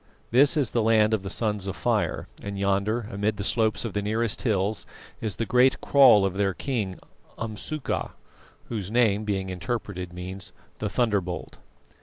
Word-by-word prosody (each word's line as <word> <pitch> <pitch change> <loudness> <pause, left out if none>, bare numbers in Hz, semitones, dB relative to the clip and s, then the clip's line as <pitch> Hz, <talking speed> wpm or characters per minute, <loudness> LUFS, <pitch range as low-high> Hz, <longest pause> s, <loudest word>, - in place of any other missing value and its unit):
This 140 +6 +5
is 140 -6 +1
the 120 - +1
land 110 -1 +4
of 110 - +1
the 95 - -6
Sons 105 -3 0
of 95 - -3
Fire, - - 0
and 100 0 -5
yonder 100 +3 0
amid 105 0 -1
the 100 - -3
slopes 110 +1 +1
of 110 - -4
the 105 - -1
nearest 110 +2 0
hills 100 -3 0 0.3
is 110 -4 -2
the 115 - -2
great 125 +3 +4
kraal 125 -8 +6
of 95 - -1
their 100 -2 +1
king, 110 -9 -3 0.4
Umsuka, 115 +7 -3 0.6
whose 105 -5 -3
name, 110 -3 +2
being 95 -2 -2
interpreted, 90 -1 -4
means 90 +2 -7 0.3
The - - -2
Thunderbolt. 100 -8 -1
105 Hz, 165 wpm, -26 LUFS, 95-115 Hz, 0.6 s, kraal